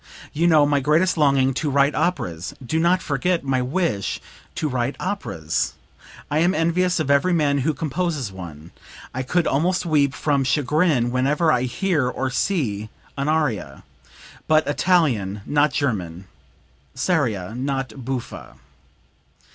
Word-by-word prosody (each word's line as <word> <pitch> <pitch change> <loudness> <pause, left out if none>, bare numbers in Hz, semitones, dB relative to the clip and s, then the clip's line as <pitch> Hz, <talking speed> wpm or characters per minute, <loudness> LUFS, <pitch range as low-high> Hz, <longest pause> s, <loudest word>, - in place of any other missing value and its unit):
You 165 +3 +2
know 155 -3 +5
my 145 0 +2
greatest 155 +7 +2
longing 135 -4 +3
to 145 +3 -1
write 140 +1 +3
operas....Do 120 - -2
not 175 +3 +2
forget 165 +5 0
my 135 -2 0
wish 125 - -1 0.4
to 155 - -1
write 130 0 -1
operas! 85 - -2 0.6
I 150 - +2
am 175 +4 +2
envious 180 +2 +1
of 140 -3 0
every 170 +6 +3
man 145 -4 +2
who 150 +3 0
composes 155 - -2
one; 85 -3 -10 0.4
I 130 - -2
could 165 +6 0
almost 175 +7 +1
weep 145 -4 +2
from 140 -3 +1
chagrin 145 -2 +1
whenever 145 +6 +2
I 125 -3 +1
hear 155 -3 0
or 130 +1 -3
see 110 - -1 0.3
an 140 +1 -1
aria. 130 - -1 0.6
But 155 0 +4
Italian, 140 - +1
not 145 0 +2
German; 95 - -2 0.7
seria 125 - 0
not 135 -1 -3
buffa." 130 -1 -6
140 Hz, 135 wpm, -22 LUFS, 125-160 Hz, 0.7 s, know